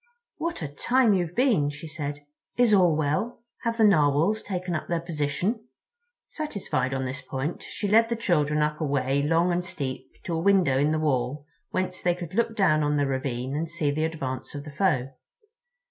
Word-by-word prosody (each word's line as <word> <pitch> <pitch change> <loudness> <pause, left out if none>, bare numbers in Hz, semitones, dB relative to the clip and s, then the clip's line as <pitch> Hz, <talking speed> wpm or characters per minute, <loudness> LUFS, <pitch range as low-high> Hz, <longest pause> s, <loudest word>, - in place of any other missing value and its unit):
"What 335 - -3
a - - -2
time 235 - +2
you've 175 -3 -1
been," 230 - +3
she 150 +2 -8
said. 145 -2 -5 0.3
"Is 245 -3 +4
all 180 -5 +5
well? 155 +11 -1 0.2
Have 230 -1 -1
the 225 - +4
Narwhals 170 +2 +4
taken 185 -2 -3
up 155 - -3
their 170 -1 0
position?" 170 - -2 0.6
Satisfied 200 - -2
on 135 -1 -1
this 130 +1 -4
point, 135 +5 -4
she 205 - -4
led 225 +3 +5
the 235 - 0
children 150 -8 +1
up 150 +1 -2
a - - +1
way 140 -1 +1
long 165 +4 +2
and 175 +1 0
steep 140 -6 -5
to 170 - -3
a 165 - 0
window 175 -7 +3
in 145 +2 +2
the 155 - +1
wall 145 -1 -1 0.2
whence 185 0 -2
they 175 -1 +2
could 175 -2 -7
look 230 +1 +1
down 155 -7 +3
on 150 0 +1
the 145 - +2
ravine 130 -1 -2
and 160 +2 -2
see 160 -4 0
the 155 +2 0
advance 140 -5 -4
of 145 - -5
the 150 - -9
foe. 135 -6 +1
160 Hz, 195 wpm, -26 LUFS, 145-190 Hz, 0.6 s, all